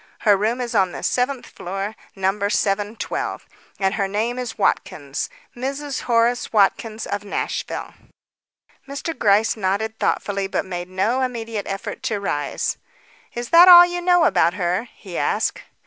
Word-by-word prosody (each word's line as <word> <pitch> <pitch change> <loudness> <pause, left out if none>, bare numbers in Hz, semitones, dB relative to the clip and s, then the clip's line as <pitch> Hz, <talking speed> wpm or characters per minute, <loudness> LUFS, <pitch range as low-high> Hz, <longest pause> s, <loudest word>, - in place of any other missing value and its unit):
Her 205 -2 +5
room 220 +5 0
is 240 -1 -4
on 190 -4 +2
the - - -7
seventh 255 +1 0
floor, 195 +4 -5 0.2
number 195 +1 0
712, 205 +1 -2 0.3
and 190 0 +1
her 200 -2 0
name 225 +5 -1
is 245 -2 -5
Watkins. 140 -1 -1 0.3
Mrs. 275 +3 -4
Horace 235 +1 +2
Watkins 220 +1 +1
of 205 0 -3
Nashville." 200 - -4 0.9
Mr. 280 +4 -4
Gryce 215 -2 +3
nodded 215 +2 -2
thoughtfully, 200 -1 -1
but 195 - -2
made 175 -1 -5
no 205 +8 0
immediate 230 -4 -3
effort 195 0 -5
to 225 -6 -2
rise. 145 -8 -2 0.6
"Is 240 0 -4
that 345 +2 +8
all 350 -1 +11
you 350 0 -3
know 355 -1 +4
about 180 - +3
her?" 185 +5 -1
he 185 -4 -7
asked. - - 0
215 Hz, 145 wpm, -22 LUFS, 195-245 Hz, 0.9 s, all